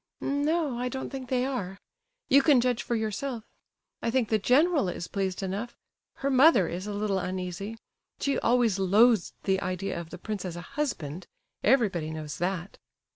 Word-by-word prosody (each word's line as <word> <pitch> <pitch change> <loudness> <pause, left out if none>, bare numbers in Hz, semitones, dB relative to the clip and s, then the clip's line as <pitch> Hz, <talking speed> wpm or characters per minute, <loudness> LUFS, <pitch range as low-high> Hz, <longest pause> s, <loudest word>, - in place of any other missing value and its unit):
"N 285 +1 -1
no, 305 -5 0
I 250 0 -1
don't 265 +1 -5
think 265 -2 -6
they 255 -1 +1
are. 200 -9 -3 0.5
You 280 +2 +6
can 280 -2 +5
judge 245 -1 +1
for 240 - -2
yourself. 225 +2 -3 0.6
I - - 0
think 235 -2 +1
the 220 - +2
general 280 - +3
is 170 -1 -5
pleased 195 -1 -2
enough; 200 +6 -4 0.4
her 275 0 -1
mother 260 - +6
is 180 +4 -5
a 210 - -3
little 205 -2 0
uneasy. 185 +4 -4 0.4
She 280 - 0
always 235 -5 +2
loathed 210 +2 +4
the 190 0 +1
idea 185 -1 -3
of 165 - -11
the 180 - -8
prince 205 +1 -5
as 180 -3 -5
a 175 - -6
husband; 180 - -3 0.4
everybody 205 - +2
knows 155 -3 -6
that." 180 +1 -3
215 Hz, 180 wpm, -28 LUFS, 185-255 Hz, 0.6 s, You